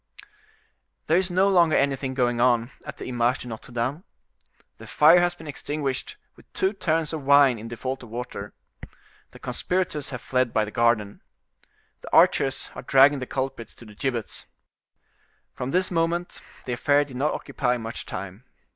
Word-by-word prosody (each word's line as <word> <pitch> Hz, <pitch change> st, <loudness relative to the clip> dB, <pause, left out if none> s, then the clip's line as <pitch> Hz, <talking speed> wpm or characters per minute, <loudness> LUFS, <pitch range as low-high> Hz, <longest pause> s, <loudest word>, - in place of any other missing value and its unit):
There 160 Hz, -, +3 dB
is 185 Hz, 0 st, +1 dB
no 185 Hz, +2 st, +3 dB
longer 175 Hz, -5 st, +4 dB
anything 135 Hz, -1 st, 0 dB
going 120 Hz, -2 st, +1 dB
on 120 Hz, 0 st, +2 dB, 0.2 s
at -, -, -7 dB
the -, -, -7 dB
Image 125 Hz, 0 st, +1 dB
de -, -, -9 dB
Notre 115 Hz, +2 st, -9 dB
Dame. 130 Hz, +8 st, -2 dB, 0.8 s
The -, -, -11 dB
fire 160 Hz, +4 st, +6 dB
has 175 Hz, 0 st, +1 dB
been 165 Hz, -, -13 dB
extinguished 145 Hz, -2 st, -4 dB, 0.2 s
with -, -, -21 dB
two 190 Hz, +2 st, 0 dB
tuns 160 Hz, -5 st, -1 dB
of 160 Hz, -, -3 dB
wine 140 Hz, -3 st, +5 dB
in 110 Hz, -, -8 dB
default 130 Hz, +3 st, -5 dB
of 120 Hz, -, -12 dB
water. 115 Hz, -3 st, -7 dB, 0.7 s
The -, -, -15 dB
conspirators 175 Hz, -6 st, -2 dB
have 125 Hz, -2 st, -5 dB
fled 125 Hz, -1 st, 0 dB
by 110 Hz, -1 st, +2 dB
the 105 Hz, -, -8 dB
garden. 115 Hz, -3 st, +1 dB, 0.8 s
The -, -, -10 dB
archers 135 Hz, -1 st, +3 dB
are -, -, -7 dB
dragging 135 Hz, +2 st, +5 dB
the 130 Hz, -, -5 dB
culprits 130 Hz, -4 st, -4 dB
to 120 Hz, -, -14 dB
the 105 Hz, -, -13 dB
gibbets. 120 Hz, 0 st, -4 dB, 1.1 s
From 125 Hz, -, -5 dB
this 185 Hz, +5 st, +1 dB
moment 170 Hz, +1 st, -1 dB, 0.2 s
the 125 Hz, -, -3 dB
affair 145 Hz, +4 st, +2 dB
did 130 Hz, -3 st, -10 dB
not 145 Hz, +4 st, 0 dB
occupy 125 Hz, -3 st, -1 dB
much 115 Hz, 0 st, -7 dB
time. 100 Hz, +5 st, -7 dB
135 Hz, 170 wpm, -25 LUFS, 120-155 Hz, 1.1 s, fire